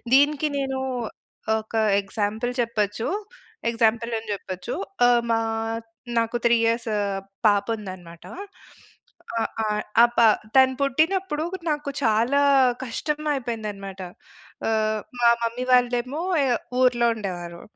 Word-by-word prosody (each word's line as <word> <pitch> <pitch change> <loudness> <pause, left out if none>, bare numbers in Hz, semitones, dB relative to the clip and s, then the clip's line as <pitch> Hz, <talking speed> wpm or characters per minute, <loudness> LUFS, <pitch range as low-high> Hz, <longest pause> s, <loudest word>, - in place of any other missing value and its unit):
దీనికి 290 +2 +4
నేనూ 265 -1 -2 0.8
ఒకా 220 0 -2 0.2
ఎగ్జాంపుల్ 215 +4 -2
చెప్పచ్చు. 225 -1 -1 0.6
ఎగ్జాంపులని 230 -1 0
చెప్పొచ్చు. 185 -2 -5 0.3
ఆహ్, 240 -1 +5
మా 225 0 +3 0.8
నాకు 230 +1 0
3 235 0 +5
ఇయర్స్ 230 0 0 0.6
పాపుందనమాట. 200 -5 -1 1.2
ఆహ్, - - 0 0.2
ఆహ్, 210 0 -1 0.2
ఆ - - +9
పా 230 - +7 0.3
తను 260 0 +6
పుట్టినప్పుడు 315 +4 +1 0.3
నాకు 295 -1 -2
చాలా 230 +5 +3 0.4
కష్టం 295 +5 -3
అయిపోయింది 235 -5 -3
అనమాట. 195 -1 -9 0.7
ఆహ్, 215 -1 +1 0.2
మా 240 - +5 0.2
మమ్మీ 235 +2 -2
వాళ్ళేమో 250 +4 +2 0.2
ఎ - - +1 0.3
ఊర్లో 245 -2 +4
ఉండేవారు. 175 -4 -6
230 Hz, 105 wpm, -24 LUFS, 215-255 Hz, 1.2 s, ఆ